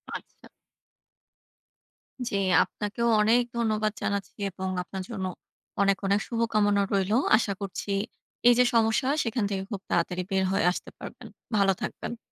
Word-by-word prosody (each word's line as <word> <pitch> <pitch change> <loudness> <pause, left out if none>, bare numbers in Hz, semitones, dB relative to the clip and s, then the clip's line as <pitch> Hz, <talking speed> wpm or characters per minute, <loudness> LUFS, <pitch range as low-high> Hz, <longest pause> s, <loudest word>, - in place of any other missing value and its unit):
আচ্ছা। - - -11 1.8
জী 220 - -3 0.3
আপনাকেও 210 +5 -3
অনেক 225 +3 +4 0.2
ধন্যবাদ 215 -2 +1
জানাচ্ছি 200 -1 -3
এবং 190 +1 -5 0.2
আপনার 190 +1 -6
জন্য 200 -5 -4 0.6
অনেক, 195 -1 +3
অনেক 200 +1 +3
শুভকামনা 215 -3 +2
রইলো। 195 +2 +2 0.2
আশা 205 -3 -1
করছি 200 +1 -4 0.6
এই 245 - +9
যে - - +8
সমস্যা, 225 +2 +3 0.2
সেইখান 230 -1 -1
থেকে 195 -1 -2
খুব 200 -3 -4
তাড়াতাড়ি 180 +1 0
বের 190 0 +2
হয়ে 195 - +1
আসতে - - -6
পারবেন। - - -9 0.3
ভালো 195 -1 +4
থাকবেন। 235 - -5
205 Hz, 135 wpm, -27 LUFS, 195-225 Hz, 1.8 s, এই